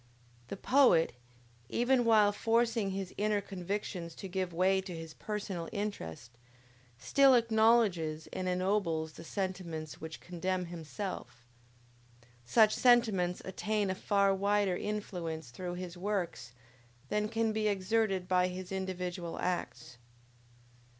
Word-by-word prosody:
The 195 - -6
poet, 245 - +4 0.6
even 245 0 +2
while 215 -3 +5
forcing 225 0 +1
his 190 -1 -4
inner 210 0 +2
convictions 185 -3 -5
to 195 - -7
give 185 -1 -2
way 190 +3 +2
to 185 -2 -7
his 165 -1 -8
personal 200 -5 -4
interest, 120 - -5 0.6
still 265 - +5
acknowledges 220 -9 +3
and 185 - -3
ennobles 180 -4 0
the 165 - -10
sentiments 170 -4 -4
which 160 0 -7
condemn 180 +1 -2
himself; 170 - -6 1.0
such 215 - +5
sentiments 220 -8 +3
attain 205 +1 -1
a - - 0
far 200 +1 +2
wider 200 -1 +1
influence 175 -9 -4
through 180 +5 -5
his 180 -1 -6
works 175 - -3 0.6
than 210 0 0
can 225 0 +1
be 215 0 0
exerted 195 -1 0
by 180 0 +3
his 185 0 -6
individual 180 -3 -4
acts. 130 -9 -3
190 Hz, 120 wpm, -32 LUFS, 175-210 Hz, 1.0 s, while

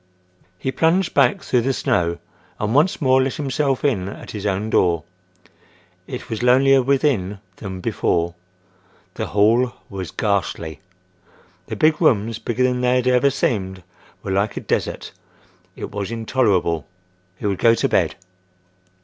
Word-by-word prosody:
He 130 - -2
plunged 170 +6 +1
back 200 - +3
through 125 - +1
the 135 +3 0
snow 85 -12 0 0.4
and 105 +1 -1
once 155 +7 +3
more 130 0 +4
let 130 0 -1
himself 140 -1 -1
in 100 -9 0
at - - -9
his 105 -1 -4
own 100 +3 -1
door. 85 -3 +2 1.0
It - - -7
was 110 - -4
lonelier 135 +2 +5
within 125 -8 +1 0.2
than 95 -3 -7
before. 85 -1 0 0.8
The - - -4
hall 115 +4 +3 0.2
was 95 -4 -5
ghastly. 95 -5 -2 0.9
The - - -4
big 155 +1 +2
rooms, 115 -7 +2
bigger 120 +2 -1
than 125 -1 +1
they 125 0 +2
had 125 -1 +1
ever 125 +2 +4
seemed, 95 -8 -2 0.4
were 95 - -4
like 100 +2 0
a - - -3
desert. - - -2 0.6
It - - -7
was 100 0 -4
intolerable: 105 - 0 0.5
He - - -7
would 100 -3 0
go 115 0 +5
to - - +1
bed. - - +1
115 Hz, 150 wpm, -21 LUFS, 95-130 Hz, 1.0 s, lonelier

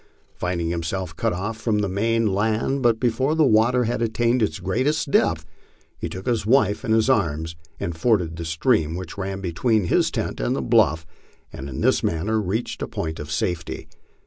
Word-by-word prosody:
Finding 85 -2 -2
himself 85 0 -3
cut - - 0
off 105 +5 -3
from 110 -1 0
the 105 -1 0
main 115 +4 +1
land, 110 +6 0
but 115 -3 +3
before 130 +5 +1
the 160 -1 +4
water 120 +2 +4
had 120 +1 -1
attained 120 +2 +1
its 110 - 0
greatest 140 - 0
depth, 80 -8 +2 0.5
he - - -3
took 95 +1 -7
his 120 -3 0
wife 110 -2 +2
in 120 - -2
his 110 +1 +3
arms 80 - 0 0.2
and 85 - -3
forded 85 -3 +1
the 85 - -5
stream 80 - +1
which 90 -2 -6
ran 95 0 -4
between 100 +5 +1
his 85 - +2
tent - - -3
and - - 0
the - - -1
bluff, 80 +2 +3 0.5
and 70 - -7
in 65 - -5
this - - +3
manner 105 +7 0
reached 105 +5 -3
a - - -2
point 80 -1 -4
of 75 +1 -7
safety. 80 +1 -2
100 Hz, 190 wpm, -23 LUFS, 85-115 Hz, 0.5 s, the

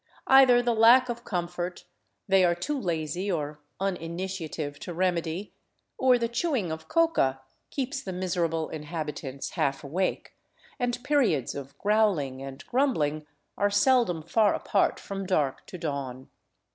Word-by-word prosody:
Either 260 -2 +7
the 240 -1 +2
lack 240 +3 +6
of 235 0 -4
comfort 175 -2 -4 0.4
they 195 -1 +5
are 175 -1 +3
too 295 +13 -3
lazy 170 +2 -2
or 150 -3 -3 0.2
uninitiative 170 -5 -4
to 175 - -7
remedy, 175 +1 -1 0.4
or 255 -1 +4
the 235 -1 0
chewing 235 - -1
of 160 0 -6
coca 325 - +2 0.3
keeps 270 0 -3
the 190 - -6
miser 180 -1 -1
able 165 -1 -2
inhabitants 150 -3 -5
half 140 -5 -1
awake, 175 +7 -2 0.5
and 245 -1 -1
periods 230 - +2
of 140 0 -8
growling 195 -11 +1
and 135 +1 -8
grumbling 155 - 0 0.3
are 205 - +3
seldom 205 -5 +3
far 205 +6 +3
apart 200 - +1
from 195 0 -5
dark 150 -8 0
to 180 - -8
dawn. 140 -5 -5
180 Hz, 140 wpm, -27 LUFS, 155-225 Hz, 0.5 s, Either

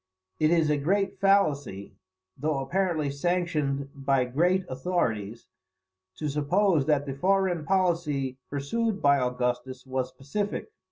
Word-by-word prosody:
It 155 - +4
is 165 -2 +3
a 150 - +2
great 195 +7 0
fallacy, 145 - +1 0.4
though 150 +1 -1
apparently 155 +1 0
sanctioned 145 -3 -1
by 135 -2 +1
great 175 +9 +1
authorities, 120 - -2 0.7
to 155 - -3
suppose 150 +2 +2
that 145 -2 +2
the 135 - -4
foreign 185 +1 +1
policy 165 -8 0
pursued 200 +10 -1
by 140 -1 +4
Augustus 125 +1 -2
was 130 -1 -2
pacific. 200 - -4
145 Hz, 120 wpm, -27 LUFS, 135-180 Hz, 0.7 s, It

